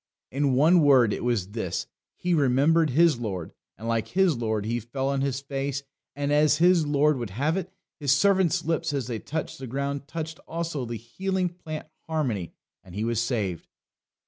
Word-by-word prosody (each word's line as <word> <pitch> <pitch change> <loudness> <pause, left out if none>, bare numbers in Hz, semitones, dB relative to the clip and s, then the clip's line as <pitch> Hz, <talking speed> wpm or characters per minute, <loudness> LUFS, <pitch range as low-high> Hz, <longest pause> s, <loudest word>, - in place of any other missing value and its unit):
In 140 0 +1
one 165 +6 +5
word, 130 -7 +5
it - - -4
was 115 -6 0
this: 100 -5 -3 0.3
he 180 0 -1
remembered 150 +3 +3
his 155 0 +4
Lord; 95 -8 -4 0.2
and, 115 - -7
like 115 -1 0
his 185 -4 +2
Lord, 110 -3 -1
he 120 +2 -1
fell 130 +4 -3
on 140 -1 0
his 135 -1 -1
face; 140 0 -3 0.3
and 145 0 -1
as 150 0 +4
his 175 -2 +4
Lord 145 -1 +3
would 120 -3 -4
have 140 - 0
it, 185 -1 -3 0.3
His 140 -3 +1
servant's 185 +3 +3
lips 165 -1 0
as 135 -4 -1
they 115 -2 -4
touched 155 +3 -5
the 130 - -6
ground 140 +2 -3
touched 160 0 -5
also 165 -5 -3
the 115 0 -4
healing 185 - -2
plant 160 -3 -7 0.2
harmony 125 - -1 0.3
and 90 -1 -13
he 105 - -2
was 115 -1 0
saved. 105 - -2
140 Hz, 185 wpm, -26 LUFS, 120-160 Hz, 0.3 s, one